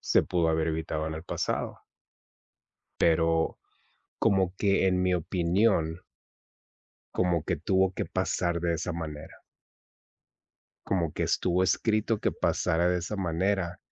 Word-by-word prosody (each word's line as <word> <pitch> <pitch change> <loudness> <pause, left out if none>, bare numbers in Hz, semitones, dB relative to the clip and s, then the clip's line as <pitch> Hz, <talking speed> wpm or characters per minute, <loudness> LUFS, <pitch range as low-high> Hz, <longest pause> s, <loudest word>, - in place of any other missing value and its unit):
se - - +3
pudo 85 -3 +1
haber 80 0 +1
evitado 80 -1 -2
en 80 - -4
el 80 +2 -7
pasado. - - -2 1.2
Pero 80 0 +2 0.6
como 95 -4 +2
que 100 -1 +2
en 90 0 +2
mi 90 0 +2
opinión 85 0 +1 1.1
como 85 -3 +1
que 90 -1 -1
tuvo 95 +4 +1
que - - -3
pasar 85 -1 -1
de 85 -1 0
esa 85 +2 -3
manera. 80 -2 -7 1.4
Como 85 -5 0
que - - -3
estuvo 90 +1 +1
escrito 110 +3 +1
que - - 0
pasara 85 +2 +1
de 90 0 +1
esa 95 +5 -4
manera 90 0 -1
85 Hz, 130 wpm, -28 LUFS, 80-95 Hz, 1.4 s, se